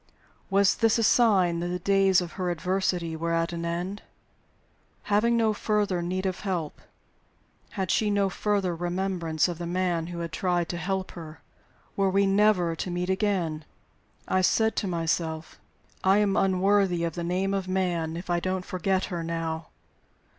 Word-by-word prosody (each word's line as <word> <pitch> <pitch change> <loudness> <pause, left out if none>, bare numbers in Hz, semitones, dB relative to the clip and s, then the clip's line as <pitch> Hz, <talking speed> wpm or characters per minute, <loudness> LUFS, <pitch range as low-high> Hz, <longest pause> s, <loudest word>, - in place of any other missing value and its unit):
Was 195 0 +4
this 225 -1 +3
a 230 - +1
sign 195 -7 +4
that 175 - -2
the 180 0 -2
days 195 0 +3
of 175 -1 -5
her 180 -2 -3
adversity 175 -1 -1
were 165 +1 -2
at 165 +1 0
an 170 0 -4
end? 175 +4 -3 1.1
Having 235 +3 +3
no 220 -2 +2
further 205 -4 0
need 185 +2 -2
of 185 -1 -2
help, 175 -6 -3 1.0
had 190 -2 0
she 215 - +2
no 200 -1 +2
further 195 -2 -1
remembrance 175 -2 -1
of 175 -2 -5
the 170 - -4
man 175 -2 -1
who 175 0 -6
had 170 -1 -4
tried 175 0 0
to 175 - -3
help 190 +2 -2
her? 160 -2 -10 0.5
Were 195 -1 +2
we 200 +1 +3
never 195 -4 +3
to 185 - -3
meet 180 +1 -1
again? 185 -6 -1 0.6
I 185 - +2
said 220 +4 +2
to 205 - 0
myself: 165 -2 -2 0.4
"I 190 +1 +5
am 205 -2 +2
unworthy 190 -2 +2
of 165 -2 -1
the 170 - -4
name 185 +3 0
of 195 -1 -2
man 175 -4 -1
if 175 - -7
I 175 -1 +1
don't 185 +1 -2
forget 185 +1 0
her 170 -1 -2
now!" 165 -1 -3
180 Hz, 170 wpm, -27 LUFS, 170-195 Hz, 1.1 s, I